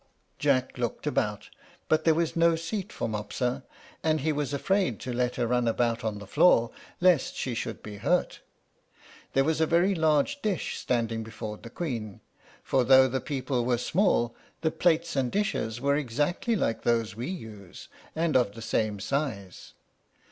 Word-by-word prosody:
Jack 130 -3 +1
looked 120 -2 -3
about, - - -1 0.4
but 155 0 +2
there 160 -1 +5
was 165 -1 0
no 170 0 +4
seat 185 +4 -4
for - - -3
Mopsa; 115 +4 -2 0.4
and 155 -2 +1
he 155 +3 +1
was 145 -2 -2
afraid 180 - 0
to 125 - -4
let 125 0 0
her 120 - 0
run 125 0 +1
about 115 0 0
on 110 -2 -2
the 100 - -9
floor, 130 - +4 0.3
lest 175 -6 +3
she 130 - -2
should 115 - -4
be 105 -1 -8
hurt. - - 0 0.9
There 135 - +4
was 160 +2 0
a 160 - +3
very 175 +5 +3
large 160 - +1
dish 205 - -2
standing 115 -2 -1
before 110 -1 -6
the 115 - -11
Queen; 115 - -4 0.4
for 130 -2 +2
though 130 +1 +7
the 130 +1 -2
people 130 -3 -2
were 120 0 +1
small, 125 - +1 0.3
the 160 -1 +1
plates 170 -1 +1
and 130 -3 0
dishes 120 - -1
were 140 +2 +2
exactly 150 - 0
like 115 - 0
those 115 -4 0
we 120 +4 -4
use, 110 - -8 0.3
and 165 -1 0
of 120 -6 +3
the 115 - -10
same 110 -2 -1
size. 110 -6 -4
130 Hz, 170 wpm, -28 LUFS, 115-160 Hz, 0.9 s, though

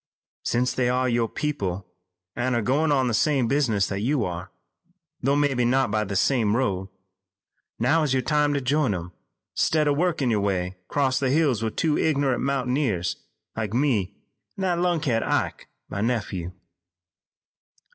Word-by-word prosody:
"Since 125 +1 0
they 125 -1 +1
are 130 +1 +1
your 120 -2 +1
people 100 -12 -3 0.5
an' 125 +1 0
are 115 - 0
goin' 145 +6 +2
on 135 -3 +2
the 120 - 0
same 135 +1 +2
business 115 -8 +2
that 95 - -3
you 130 +1 +1
are, 90 +1 -5 0.7
though 140 +3 +2
mebbe 145 -3 +1
not 130 -2 +2
by 105 0 0
the 100 0 -4
same 110 0 +2
road, 95 -7 -1 0.9
now 150 +8 +2
is 150 -3 0
your 130 -1 +1
time 150 +1 +2
to 140 - 0
join 135 -4 +1
'em, 85 0 -6 0.4
'stead 155 -1 +2
o' 145 - +3
workin' 155 -5 +1
your 105 -2 +1
way 95 -2 -1
'cross 135 -2 +1
the 135 - 0
hills 140 -5 +2
with 110 -1 -2
two 155 -2 +1
ignorant 140 -5 +1
mountaineers 125 - 0 0.4
like 110 -1 -3
me 120 -9 +1 0.4
an' - - -5
that 175 -2 +1
lunkhead, 165 -10 +1
Ike, - - -1 0.2
my 100 - -4
nephew." 105 -7 -2
125 Hz, 165 wpm, -25 LUFS, 105-145 Hz, 0.9 s, o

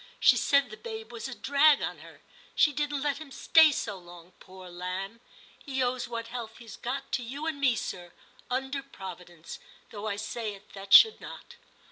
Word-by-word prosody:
She - - +6
said 280 -5 +2
the 215 - -9
babe 445 -1 -8
was 235 +2 -6
a 265 - -7
drag 285 +3 +4
on - - -4
her; - - -15 0.3
she 295 - +4
didn't 290 -1 -2
let 290 0 -1
him 310 - -9
stay 315 +3 +5
so 205 -8 -4
long, 175 0 -14
poor 185 0 -13
lamb. 185 +5 -6 0.4
He 265 -3 -1
owes 250 0 -1
what 230 -1 -5
health 235 -2 -7
he's 230 -4 -11
got 270 +3 -5
to - - 0
you 275 +6 -6
and 310 -3 -3
me, 255 -4 +4
sir, 175 -5 -6 0.4
under 265 +2 -2
Providence, 180 -9 -10 0.3
though 210 0 -6
I 205 - -1
say 215 0 -4
it 200 +1 -19
that 195 0 -10
should 445 - +8
not.' - - -11
240 Hz, 190 wpm, -28 LUFS, 195-280 Hz, 0.4 s, should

